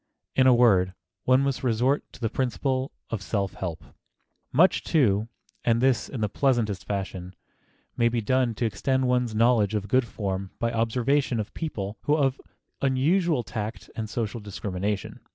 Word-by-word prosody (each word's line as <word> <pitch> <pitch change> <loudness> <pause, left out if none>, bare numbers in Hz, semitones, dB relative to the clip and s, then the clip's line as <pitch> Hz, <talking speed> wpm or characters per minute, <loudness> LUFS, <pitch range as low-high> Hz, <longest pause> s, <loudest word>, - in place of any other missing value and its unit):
In 130 0 +5
a 130 - +7
word, 95 -6 +4 0.3
one 130 +1 +5
must 140 -1 -1
resort 125 +4 +2
to - - -13
the 115 - 0
principle 130 +2 -1 0.2
of 115 -4 -2
self 100 -2 -2
help. 85 -4 -5
[Sidenote: - - -20
LEARN - - -39 0.6
BY 165 - +8
OBSERVATION] - - +9
Much, - - -4
too, 110 - +2 0.4
and 115 -1 +3
this 125 -3 +2
in 125 - -5
the 105 - +2
pleasantest 110 -6 0
fashion, 95 -2 -4 0.6
may 120 0 +3
be 120 0 -1
done 125 +1 +1
to 120 - -1
extend 130 +5 0
one's 125 -3 +1
knowledge 110 -2 +3
of 100 -1 -2
good 125 +3 +2
form 95 -3 -3
by 115 0 0
observation 120 +3 +1
of 105 - -4
people 105 -10 -4
who 150 +1 +3
have 135 -1 +1 0.4
unusual 145 +2 +2
tact 110 -2 -6
and 110 -2 -4
social 115 +1 -3
discrimination. 100 -1 -4
115 Hz, 175 wpm, -26 LUFS, 105-130 Hz, 0.6 s, OBSERVATION